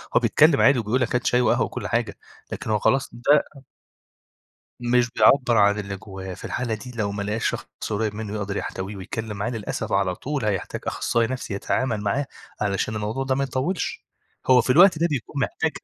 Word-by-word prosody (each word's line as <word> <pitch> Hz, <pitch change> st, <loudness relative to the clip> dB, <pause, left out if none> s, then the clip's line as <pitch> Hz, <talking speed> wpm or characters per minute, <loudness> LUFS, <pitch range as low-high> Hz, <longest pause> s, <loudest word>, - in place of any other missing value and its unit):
هو -, -, +7 dB
بيتكلم 155 Hz, -2 st, +4 dB
عادي 140 Hz, -2 st, +5 dB
وبيقول 115 Hz, +4 st, 0 dB
لك 120 Hz, -, 0 dB
هات 125 Hz, -, 0 dB
شاي 125 Hz, -, +3 dB
وقهوة 120 Hz, -, +2 dB
وكلّ -, -, -5 dB
حاجة، -, -, -1 dB, 0.3 s
لكن -, -, -5 dB
هو 105 Hz, -1 st, +2 dB
خلاص 135 Hz, +6 st, +2 dB
ده 140 Hz, +5 st, +3 dB, 1.4 s
مش 120 Hz, 0 st, +2 dB
بيعبر 125 Hz, -1 st, +4 dB
عن 100 Hz, 0 st, +4 dB
اللي 100 Hz, -1 st, -4 dB
جوّاه، 95 Hz, -1 st, -8 dB
في 95 Hz, -, -13 dB
الحالة 120 Hz, -2 st, -2 dB
دي 110 Hz, +4 st, -8 dB
لو 100 Hz, -3 st, -1 dB
ما 100 Hz, -, -3 dB
لقاش 105 Hz, +2 st, -1 dB
شخص -, -, -4 dB, 0.2 s
قريّب 105 Hz, 0 st, -1 dB
منه 105 Hz, -1 st, -5 dB
يقدر 100 Hz, -1 st, -3 dB
يحتويه 95 Hz, +2 st, -4 dB
ويتكلم 105 Hz, +3 st, -5 dB
معاه، 105 Hz, +4 st, -2 dB
للأسف 115 Hz, -4 st, -4 dB
على 95 Hz, -2 st, +1 dB
طول 140 Hz, +3 st, -3 dB
هيحتاج 100 Hz, -4 st, -2 dB
أخصائي 115 Hz, -1 st, 0 dB
نَفسي 125 Hz, -4 st, -4 dB
يتعامل 110 Hz, +2 st, -1 dB
معاه، 105 Hz, +8 st, -1 dB, 0.3 s
علشان 105 Hz, +1 st, -1 dB
الموضوع 110 Hz, +5 st, -2 dB
ده 130 Hz, 0 st, +1 dB
ما 140 Hz, +1 st, 0 dB
يطوّلش، 135 Hz, +7 st, -2 dB, 0.4 s
هو 130 Hz, -1 st, +6 dB
في 125 Hz, -, -2 dB
الوقت 175 Hz, +4 st, +7 dB
ده 170 Hz, -, +3 dB
بيكون 140 Hz, 0 st, -3 dB
محتاج 160 Hz, +6 st, 0 dB
115 Hz, 195 wpm, -24 LUFS, 105-130 Hz, 1.4 s, هو